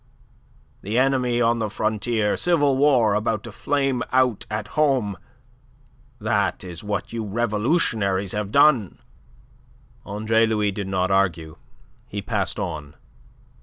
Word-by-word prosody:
The 105 +4 -2
enemy 130 -2 +2
on 115 0 +2
the 110 -1 -1
frontier; 110 0 -1
civil 145 -6 +2
war 130 -6 +3
about 105 0 -1
to 115 - -8
flame 135 +2 -1
out 130 -4 +1
at 105 0 -4
home. 135 -10 +1 1.0
That - - 0
is 90 -1 -8
what 105 +1 -4
you 115 -1 -3
revolutionaries 105 - 0
have 105 -1 -3
done." 140 - +4 1.1
Andre 110 +2 +1
Louis 105 -2 0
did 100 0 -5
not 95 0 0
argue. 85 -5 0 0.5
He 100 - -5
passed 100 -1 -2
on. 80 -7 -5
110 Hz, 125 wpm, -23 LUFS, 100-125 Hz, 1.1 s, done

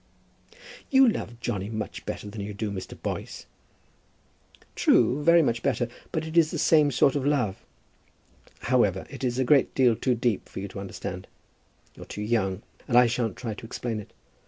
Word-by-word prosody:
"You 265 -1 +6
love 120 - -2
Johnny 105 -5 -3
much 110 -2 -6
better - - -5
than 105 0 -7
you 100 +1 -6
do 105 0 -3
Mr. 95 -2 -7
Boyce." - - -5 1.3
"True; 140 +4 +3
very 170 +1 +6
much 115 -4 0
better; 120 -2 0 0.2
but 160 0 -2
it 160 +1 -7
is 165 -2 +5
the - - -4
same 155 -3 +4
sort 135 +1 +3
of 140 - 0
love. 125 -9 0 1.0
However, - - +1
it - - -8
is 125 -1 0
a 130 - +2
great 140 +2 +3
deal 125 -4 +4
too 125 +2 0
deep 115 -3 -1
for - - -7
you 100 - -4
to 100 - -8
understand. 95 -1 -6 0.7
You're - - -11
too 105 - -5
young, 105 -3 0 0.2
and 120 - +3
I 125 - +8
shan't 115 -3 -1
try 115 -3 -4
to 105 - -10
explain 115 -1 -4
it. 105 - -11
120 Hz, 180 wpm, -26 LUFS, 105-135 Hz, 1.3 s, I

